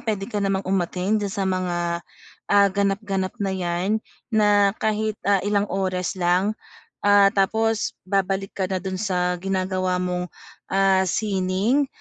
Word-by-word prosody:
puwede 210 Hz, -3 st, -2 dB
ka 210 Hz, -, -2 dB
namang 195 Hz, -1 st, 0 dB
umatend 190 Hz, +2 st, 0 dB
doon 200 Hz, -2 st, -3 dB
sa 200 Hz, -2 st, -1 dB
mga, 185 Hz, -2 st, -1 dB, 0.7 s
ah, 200 Hz, 0 st, +5 dB
ganap-ganap 195 Hz, -1 st, -1 dB
na 195 Hz, -, 0 dB
'yan 185 Hz, +3 st, -1 dB, 0.3 s
na 205 Hz, -2 st, +4 dB
kahit, 215 Hz, 0 st, -1 dB
ah, 200 Hz, -2 st, +3 dB
ilang 205 Hz, +1 st, +1 dB
oras 185 Hz, -2 st, -1 dB
lang. 185 Hz, +4 st, +2 dB, 0.5 s
Ah, 205 Hz, -1 st, +6 dB
tapos 220 Hz, +2 st, +1 dB
babalik 195 Hz, 0 st, -1 dB
ka 190 Hz, -, -1 dB
na 190 Hz, -, 0 dB
do'n 190 Hz, 0 st, -4 dB
sa 180 Hz, -3 st, 0 dB
ginagawa 185 Hz, -1 st, -1 dB
mong, 180 Hz, 0 st, -2 dB, 0.4 s
ah, 195 Hz, 0 st, +3 dB
sining, 200 Hz, -, +1 dB
195 Hz, 140 wpm, -23 LUFS, 185-205 Hz, 0.7 s, Ah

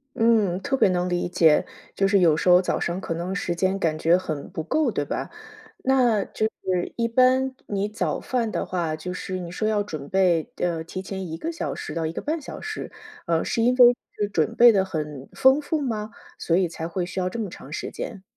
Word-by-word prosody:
嗯， 220 Hz, -6 st, +3 dB
特 275 Hz, +4 st, 0 dB
别 235 Hz, -, +4 dB
能 180 Hz, 0 st, 0 dB
理 175 Hz, 0 st, -1 dB
解， 160 Hz, -3 st, +4 dB, 0.3 s
就 195 Hz, -, +2 dB
是 200 Hz, +1 st, +4 dB
有 165 Hz, -4 st, +5 dB
时 165 Hz, -, +1 dB
候 180 Hz, 0 st, +7 dB
早 185 Hz, -, -1 dB
上 170 Hz, +2 st, -2 dB
可 170 Hz, -, -3 dB
能 175 Hz, +3 st, -3 dB
时 185 Hz, -4 st, -2 dB
间 190 Hz, +2 st, +1 dB
感 160 Hz, -5 st, 0 dB
觉 165 Hz, +3 st, +4 dB
很 155 Hz, -6 st, -5 dB
不 170 Hz, -3 st, -5 dB
够， 280 Hz, -, +1 dB
对 145 Hz, -, -2 dB
吧？ -, -, -4 dB, 0.5 s
那 245 Hz, -6 st, +3 dB
就 220 Hz, -, -1 dB
是 185 Hz, -4 st, -3 dB
一 230 Hz, -1 st, +1 dB
般 255 Hz, +2 st, +3 dB
你 200 Hz, 0 st, -1 dB
早 210 Hz, +1 st, -2 dB
饭 235 Hz, -4 st, -1 dB
的 -, -, -2 dB
话， 170 Hz, -4 st, -2 dB
就 180 Hz, +4 st, -6 dB
是 185 Hz, 0 st, -4 dB
你 175 Hz, -1 st, -6 dB
说 215 Hz, +4 st, -1 dB
要 210 Hz, -1 st, +1 dB
准 155 Hz, -8 st, -7 dB
备 180 Hz, -4 st, +2 dB
呃， 170 Hz, -2 st, -1 dB
提 185 Hz, +3 st, -6 dB
前 190 Hz, 0 st, -5 dB
1 160 Hz, 0 st, -5 dB
个 330 Hz, -, -3 dB
小 335 Hz, -, -4 dB
时 -, -, -6 dB
到 165 Hz, -1 st, -2 dB
1 -, -, -3 dB
个 -, -, -5 dB
半 310 Hz, +2 st, -2 dB
小 270 Hz, -, -8 dB
时， 435 Hz, 0 st, -6 dB, 0.4 s
呃， 165 Hz, -1 st, +1 dB
是 230 Hz, -, 0 dB
因 245 Hz, +2 st, +3 dB
为 245 Hz, -1 st, +7 dB, 0.2 s
是 205 Hz, -, 0 dB
准 160 Hz, -7 st, 0 dB
备 240 Hz, 0 st, +8 dB
的 195 Hz, -3 st, +3 dB
很 150 Hz, -7 st, -5 dB
丰 265 Hz, +3 st, +5 dB
富 310 Hz, +2 st, -1 dB
吗？ 220 Hz, -6 st, -3 dB, 0.3 s
所 170 Hz, -, +1 dB
以 185 Hz, -1 st, +2 dB
才 165 Hz, 0 st, -6 dB
会 175 Hz, +1 st, -2 dB
需 180 Hz, +2 st, -5 dB
要 180 Hz, 0 st, 0 dB
这 210 Hz, -, -6 dB
么 215 Hz, -, -2 dB
长 145 Hz, -, -11 dB
时 160 Hz, -, -4 dB
间。 205 Hz, -5 st, -6 dB
190 Hz, 245 characters per minute, -24 LUFS, 170-230 Hz, 0.5 s, 备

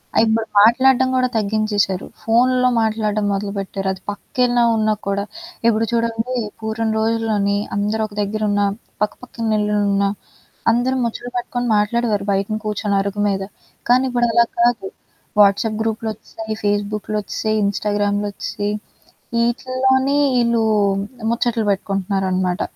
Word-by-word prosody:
ఆ -, -, +1 dB
ఇప్పుడు 220 Hz, 0 st, +1 dB
మాట్లాడ్డం 260 Hz, +3 st, +5 dB
కూడా 255 Hz, 0 st, +3 dB
తగ్గించేశారు. 205 Hz, -2 st, 0 dB, 0.2 s
ఫోన్లో 250 Hz, +2 st, +3 dB
మాట్లాడ్డం 215 Hz, -1 st, 0 dB
మొదలుపెట్టారు. 195 Hz, -1 st, -3 dB
అది 190 Hz, -, -12 dB
పక్కెలాన 245 Hz, +3 st, 0 dB, 0.2 s
ఉన్నా 215 Hz, 0 st, +2 dB
కూడా. 200 Hz, 0 st, 0 dB, 0.4 s
ఇప్పుడు 225 Hz, 0 st, +3 dB
చూడండి 230 Hz, +1 st, -1 dB, 0.3 s
పూర్వం 220 Hz, 0 st, -1 dB
రోజుల్లోని 220 Hz, -3 st, +1 dB, 0.2 s
అందరొక 210 Hz, +1 st, -1 dB
దెగ్గరున్నా 205 Hz, 0 st, 0 dB, 0.4 s
పక్కపక్కల 225 Hz, 0 st, -3 dB
ఇల్లలున్న 205 Hz, -1 st, +1 dB, 0.7 s
అందరూ 250 Hz, +3 st, +1 dB
ముచ్చలు 240 Hz, +1 st, -4 dB
పట్టుకొని 245 Hz, 0 st, -2 dB
మాట్లాడేవారు. 210 Hz, -1 st, 0 dB
బయటన 200 Hz, +2 st, 0 dB
కూర్చొని 210 Hz, -1 st, -1 dB
అరుగు 200 Hz, +1 st, -4 dB
మీద. 195 Hz, -1 st, -1 dB, 0.4 s
కానీ 250 Hz, +2 st, +5 dB
ఇప్పుడలా 235 Hz, -1 st, +3 dB
కాదు. 235 Hz, -4 st, +2 dB, 0.5 s
వాట్స్‌అప్ 205 Hz, +2 st, +4 dB
గ్రూప్‌లొచ్చసాయి, 220 Hz, 0 st, -4 dB
ఫేస్‌బుక్‌లొచ్చేసాయి, 210 Hz, +1 st, -1 dB
ఇన్‌స్టాగ్రామ్‌లొచ్చేసాయి. 205 Hz, 0 st, -1 dB, 0.6 s
వీటిల్లోనే 260 Hz, +3 st, +1 dB, 0.2 s
ఈళ్ళు 235 Hz, -1 st, +2 dB, 0.7 s
ముచ్చట్లు 235 Hz, -2 st, 0 dB
పెట్టుకుంటున్నారనమాట. 190 Hz, -1 st, -1 dB
215 Hz, 105 wpm, -20 LUFS, 205-235 Hz, 0.7 s, మాట్లాడ్డం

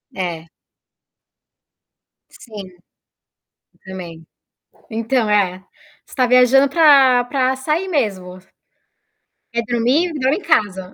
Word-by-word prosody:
É. 170 Hz, -3 st, -5 dB, 1.8 s
Sim 195 Hz, -6 st, -13 dB, 1.1 s
também. 175 Hz, -4 st, -10 dB, 0.7 s
Então, 225 Hz, +1 st, -1 dB
é, 190 Hz, -3 st, 0 dB, 0.4 s
você -, -, -16 dB
tá 255 Hz, -2 st, +1 dB
viajando 250 Hz, +2 st, +4 dB
pra 275 Hz, -5 st, +4 dB
pra 260 Hz, +1 st, -1 dB
sair 310 Hz, +8 st, -3 dB
mesmo. 195 Hz, -, -3 dB, 1.2 s
Quer 235 Hz, -, -1 dB
dormir, 250 Hz, +9 st, 0 dB
dorme 280 Hz, +2 st, -1 dB
em -, -, -9 dB
casa 200 Hz, -, -1 dB
240 Hz, 95 wpm, -18 LUFS, 190-270 Hz, 1.8 s, viajando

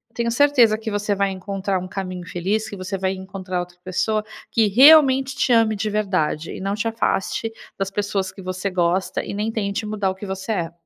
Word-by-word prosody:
tenho 235 Hz, 0 st, 0 dB
certeza 250 Hz, -5 st, +4 dB
que 220 Hz, 0 st, -5 dB
você 205 Hz, 0 st, 0 dB
vai 200 Hz, 0 st, +1 dB
encontrar 190 Hz, 0 st, -2 dB
um 185 Hz, -, -6 dB
caminho 185 Hz, -2 st, -5 dB
feliz, 195 Hz, +6 st, -1 dB
que 200 Hz, -, -7 dB
você 185 Hz, +1 st, -4 dB
vai 190 Hz, 0 st, 0 dB
encontrar 190 Hz, -1 st, -5 dB
outra 175 Hz, 0 st, -7 dB
pessoa 215 Hz, +4 st, 0 dB, 0.3 s
que 225 Hz, -3 st, +3 dB
realmente 270 Hz, +3 st, +6 dB
te -, -, +1 dB
ame 225 Hz, -1 st, +4 dB
de 215 Hz, +1 st, -2 dB
verdade, 185 Hz, -7 st, -1 dB
e -, -, -7 dB
não 195 Hz, +1 st, -1 dB
te 210 Hz, +2 st, -2 dB
afaste 225 Hz, 0 st, -1 dB, 0.3 s
das 195 Hz, 0 st, -2 dB
pessoas 200 Hz, -1 st, -2 dB
que 195 Hz, -, -12 dB
você 185 Hz, +1 st, -3 dB
gosta 180 Hz, +1 st, 0 dB
e -, -, -6 dB
nem 210 Hz, +2 st, -2 dB
tente 210 Hz, -1 st, -2 dB
mudar 210 Hz, -2 st, -1 dB
o 185 Hz, -, -3 dB
que 190 Hz, -, -8 dB
você 190 Hz, +3 st, -3 dB
é. 170 Hz, -4 st, -2 dB
200 Hz, 210 wpm, -22 LUFS, 185-220 Hz, 0.3 s, realmente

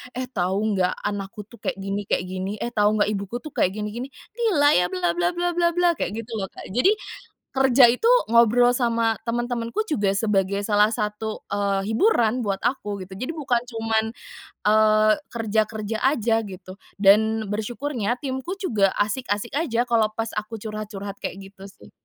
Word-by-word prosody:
"Eh, 255 Hz, -, -2 dB
tahu 195 Hz, +3 st, 0 dB
nggak 180 Hz, 0 st, 0 dB
anakku 205 Hz, 0 st, -4 dB
tuh, 235 Hz, -, -14 dB
kayak -, -, -3 dB
gini 195 Hz, +1 st, -4 dB
kayak -, -, 0 dB
gini, 190 Hz, +2 st, -3 dB
eh, 240 Hz, -, -3 dB
tahu 210 Hz, -1 st, +2 dB
nggak, 210 Hz, 0 st, +2 dB
ibuku 200 Hz, +4 st, -4 dB
tuh 305 Hz, -, -8 dB
kayak, 185 Hz, -5 st, +1 dB
gini-gini, 215 Hz, +5 st, -4 dB, 0.2 s
gila 410 Hz, -11 st, +3 dB
ya 180 Hz, -6 st, +3 dB
bla-bla-bla-bla-bla", 340 Hz, -, +1 dB
kayak 200 Hz, -, -2 dB
gitu 230 Hz, +1 st, -7 dB
loh, 195 Hz, -, -3 dB
Kak. -, -, -11 dB
Jadi, 370 Hz, -, +3 dB, 0.5 s
kerja 265 Hz, -2 st, +5 dB
itu 250 Hz, -, -1 dB, 0.2 s
ngobrol 235 Hz, +1 st, +5 dB
sama 230 Hz, -2 st, +1 dB
teman-temanku 240 Hz, -, -2 dB
juga, 205 Hz, -9 st, +1 dB
sebagai 200 Hz, -1 st, +1 dB
salah 210 Hz, +1 st, +3 dB
satu, 215 Hz, 0 st, -3 dB
eee, 200 Hz, 0 st, 0 dB
hiburan 235 Hz, -, +2 dB
buat 195 Hz, -1 st, -2 dB
aku, 210 Hz, -5 st, -2 dB
gitu. 190 Hz, +1 st, -10 dB
Jadi, 255 Hz, +7 st, -3 dB
bukan 270 Hz, -6 st, 0 dB
cuman, 225 Hz, -2 st, 0 dB, 0.6 s
eee, 215 Hz, 0 st, +5 dB, 0.2 s
kerja-kerja 220 Hz, -1 st, -2 dB
aja, 235 Hz, -4 st, +2 dB
gitu. 190 Hz, -2 st, -10 dB, 0.2 s
Dan, 215 Hz, +2 st, +4 dB
bersyukurnya 240 Hz, +2 st, -2 dB
timku 265 Hz, +7 st, -4 dB
juga 215 Hz, -, +2 dB
asik-asik 205 Hz, +1 st, -1 dB
aja, 240 Hz, -7 st, 0 dB
kalau 230 Hz, -3 st, +3 dB
pas 225 Hz, +1 st, -4 dB
aku 215 Hz, +2 st, -8 dB
curhat-curhat, 205 Hz, -2 st, -6 dB
kayak 195 Hz, 0 st, -6 dB
gitu, 195 Hz, 0 st, -12 dB
sih. -, -, -17 dB
220 Hz, 160 wpm, -23 LUFS, 200-240 Hz, 0.6 s, kerja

